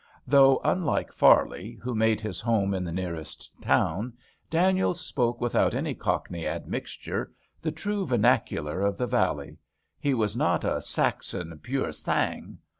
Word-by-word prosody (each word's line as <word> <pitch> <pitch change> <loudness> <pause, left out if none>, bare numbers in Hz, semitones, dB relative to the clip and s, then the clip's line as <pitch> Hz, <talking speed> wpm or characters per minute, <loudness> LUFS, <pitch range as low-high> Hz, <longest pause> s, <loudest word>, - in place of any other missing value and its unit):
Though, 135 0 +6
unlike 180 -5 0
Farley, 105 +6 +4
who 125 0 -2
made 110 -1 +2
his 105 -4 -5
home 105 -4 +1
in 95 -1 -1
the 85 - -4
nearest 85 -3 -6
town, 115 +5 +1 0.4
Daniels 180 +1 +2
spoke 120 -7 -1
without 120 -1 +2
any - - -1
Cockney 85 -2 -2
admixture, - - -4 0.3
the 160 - -1
true 195 +4 -3
vernacular 110 - +1
of 100 0 +1
the 125 - 0
valley, 120 - 0 0.4
he 140 -2 +1
was 105 -4 0
not - - +1
a - - 0
Saxon, 85 -2 -2
pur - - -9
34 130 - -3
DANIELS - - -4
sang. - - -1
115 Hz, 150 wpm, -27 LUFS, 95-135 Hz, 0.4 s, Though